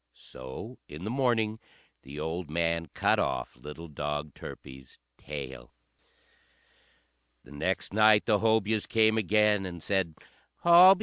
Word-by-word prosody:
So 65 Hz, -, -10 dB
in 75 Hz, +4 st, -9 dB
the 105 Hz, -, -3 dB
morning 115 Hz, -4 st, +1 dB, 0.4 s
the 70 Hz, +3 st, -9 dB
old 80 Hz, +1 st, -4 dB
man 85 Hz, +1 st, 0 dB
cut -, -, +2 dB
off -, -, -2 dB
little 75 Hz, +6 st, -9 dB
dog 75 Hz, -1 st, -4 dB
Turpie's 65 Hz, -1 st, -11 dB, 0.2 s
tail. 65 Hz, -4 st, -8 dB, 1.7 s
The -, -, -17 dB
next 85 Hz, +7 st, -2 dB
night 110 Hz, 0 st, +5 dB
the 105 Hz, -3 st, +3 dB
Hobyahs 110 Hz, -1 st, +1 dB
came 110 Hz, -1 st, +3 dB
again, 105 Hz, -1 st, +3 dB
and 85 Hz, -4 st, -7 dB
said, 95 Hz, -5 st, -1 dB, 0.5 s
"Hobyah! 175 Hz, +3 st, +9 dB
Hobyah! -, -, -12 dB
90 Hz, 130 wpm, -29 LUFS, 75-110 Hz, 1.7 s, Hobyah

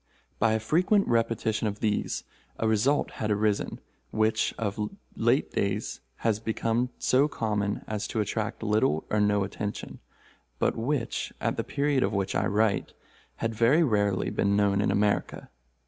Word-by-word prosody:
By 110 Hz, 0 st, +3 dB
a 110 Hz, -, +1 dB
frequent 180 Hz, -, +2 dB
repetition 115 Hz, -1 st, +1 dB
of 105 Hz, 0 st, -4 dB
these, 105 Hz, -2 st, -1 dB, 0.3 s
a 110 Hz, -, 0 dB
result 110 Hz, +7 st, +2 dB
had 110 Hz, -, 0 dB
arisen, 105 Hz, 0 st, 0 dB, 0.3 s
which 110 Hz, -, +1 dB
of 105 Hz, -1 st, -2 dB, 0.3 s
late -, -, +2 dB
days -, -, -1 dB, 0.3 s
has 110 Hz, -2 st, +2 dB
become 115 Hz, +2 st, 0 dB
so 135 Hz, +3 st, +3 dB
common 105 Hz, -6 st, -2 dB
as 105 Hz, -1 st, -3 dB
to 110 Hz, -, -3 dB
attract 110 Hz, +1 st, -2 dB
little 105 Hz, -8 st, +1 dB
or 105 Hz, -, +2 dB
no 105 Hz, -1 st, +3 dB
attention, 100 Hz, +1 st, -5 dB, 0.6 s
but -, -, +1 dB
which, 120 Hz, +1 st, -2 dB
at -, -, 0 dB
the -, -, -2 dB
period 140 Hz, -1 st, 0 dB
of 100 Hz, -1 st, +1 dB
which 100 Hz, -1 st, -1 dB
I -, -, +1 dB
write, 105 Hz, +1 st, +1 dB, 0.4 s
had 115 Hz, 0 st, -2 dB
very 120 Hz, +9 st, +4 dB
rarely 105 Hz, -7 st, +1 dB
been 100 Hz, 0 st, +1 dB
known 100 Hz, -1 st, +3 dB
in -, -, +1 dB
America. 105 Hz, -8 st, 0 dB
110 Hz, 155 wpm, -28 LUFS, 105-115 Hz, 0.6 s, very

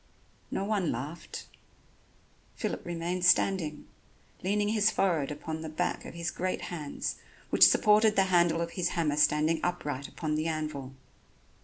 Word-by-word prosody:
No 195 Hz, -, -2 dB
one 200 Hz, -6 st, 0 dB
laughed. 145 Hz, +8 st, -6 dB, 1.1 s
Philip -, -, -3 dB
remained 175 Hz, +1 st, -3 dB
standing, 180 Hz, -4 st, +2 dB, 0.6 s
leaning 205 Hz, +2 st, +1 dB
his 215 Hz, 0 st, +3 dB
forehead 170 Hz, -10 st, +1 dB
upon 155 Hz, +2 st, -5 dB
the 160 Hz, -, -5 dB
back 180 Hz, +3 st, -2 dB
of -, -, -9 dB
his 170 Hz, -1 st, -3 dB
great 185 Hz, +1 st, -2 dB
hands, 150 Hz, -4 st, -4 dB, 0.3 s
which -, -, +8 dB
supported 215 Hz, 0 st, +4 dB
the 195 Hz, -, +5 dB
handle 170 Hz, -1 st, +4 dB
of 170 Hz, 0 st, -3 dB
his 180 Hz, -2 st, -1 dB
hammer 150 Hz, -3 st, +1 dB
standing 150 Hz, +2 st, +3 dB
upright 145 Hz, -6 st, -2 dB
upon 155 Hz, -2 st, -4 dB
the 155 Hz, +1 st, 0 dB
anvil. 150 Hz, -4 st, -4 dB
170 Hz, 145 wpm, -29 LUFS, 150-185 Hz, 1.1 s, which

